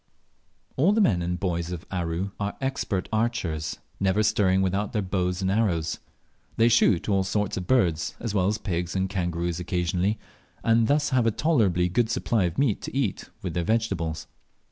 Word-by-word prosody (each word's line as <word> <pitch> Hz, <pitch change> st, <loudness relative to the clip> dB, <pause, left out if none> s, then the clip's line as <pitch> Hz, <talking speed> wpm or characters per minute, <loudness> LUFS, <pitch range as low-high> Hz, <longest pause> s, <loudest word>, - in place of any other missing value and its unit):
All 165 Hz, +10 st, +4 dB
the 220 Hz, -, +2 dB
men 100 Hz, -, +3 dB
and 90 Hz, +1 st, -2 dB
boys 85 Hz, -3 st, -1 dB
of 90 Hz, 0 st, -6 dB
Aru 90 Hz, +1 st, -2 dB
are 100 Hz, 0 st, -3 dB
expert 135 Hz, -8 st, -2 dB
archers, 95 Hz, -10 st, -1 dB, 0.2 s
never 95 Hz, +2 st, +2 dB
stirring 95 Hz, -2 st, +3 dB
without 100 Hz, +5 st, -1 dB
their 105 Hz, -, +1 dB
bows 90 Hz, 0 st, -1 dB
and 95 Hz, -, +1 dB
arrows. 90 Hz, -7 st, 0 dB, 0.6 s
They 115 Hz, +1 st, +5 dB
shoot 110 Hz, -6 st, +3 dB
all 100 Hz, -2 st, +2 dB
sorts 105 Hz, +1 st, -1 dB
of 90 Hz, -1 st, -4 dB
birds, 85 Hz, -11 st, +2 dB
as 115 Hz, -3 st, -3 dB
well 95 Hz, -3 st, +2 dB
as 105 Hz, +1 st, +1 dB
pigs 90 Hz, -4 st, -3 dB
and 95 Hz, 0 st, +1 dB
kangaroos 85 Hz, -3 st, -2 dB
occasionally, 90 Hz, +3 st, 0 dB, 0.5 s
and 115 Hz, 0 st, +3 dB
thus 145 Hz, +1 st, +2 dB
have 125 Hz, -3 st, +3 dB
a -, -, +6 dB
tolerably 110 Hz, -, +2 dB
good 110 Hz, +5 st, +1 dB
supply 115 Hz, -3 st, +1 dB
of 85 Hz, 0 st, -3 dB
meat 130 Hz, -8 st, +1 dB
to -, -, -5 dB
eat 120 Hz, -9 st, -1 dB
with 90 Hz, -3 st, -3 dB
their 85 Hz, -, -1 dB
vegetables. 95 Hz, -7 st, -1 dB
95 Hz, 180 wpm, -26 LUFS, 90-115 Hz, 0.6 s, a